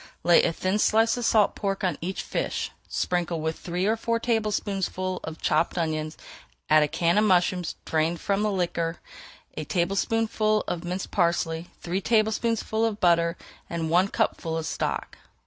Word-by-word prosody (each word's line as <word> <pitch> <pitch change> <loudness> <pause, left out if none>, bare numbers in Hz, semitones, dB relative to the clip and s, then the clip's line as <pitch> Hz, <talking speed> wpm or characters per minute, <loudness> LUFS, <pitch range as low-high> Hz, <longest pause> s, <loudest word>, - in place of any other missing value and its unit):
Lay 175 -1 +6
a - - +1
thin 185 +5 -1
slice 225 +1 +3
of 245 -1 -3
salt 215 -3 +4
pork 195 -1 -2
on 180 -4 +1
each 185 +3 -3
fish, - - -2 0.2
sprinkle 175 -2 -1
with 160 +1 -3
three 180 +1 -2
or 220 +2 +3
four 230 +1 -1
tablespoonfuls 200 -5 -1
of 160 0 -7
chopped 155 +3 +1
onions, 155 -2 -2 0.5
add 155 0 +7
a 150 - +3
can 170 +6 +2
of - - +3
mushrooms 180 -3 +2
drained 160 +1 0
from 200 0 0
the 210 0 +1
liquor, 170 -3 -1 0.6
a 155 - -3
tablespoonful 215 +5 +1
of 175 0 -3
minced 180 +2 -4
parsley, 170 -2 0
three 180 +3 -2
tablespoonfuls 220 +1 +1
of 215 -2 -4
butter, 170 -1 +3 0.3
and 165 -1 -2
one 180 +3 +4
cupful 165 -4 -1
of 160 - -3
stock. - - -3
180 Hz, 165 wpm, -26 LUFS, 170-210 Hz, 0.6 s, add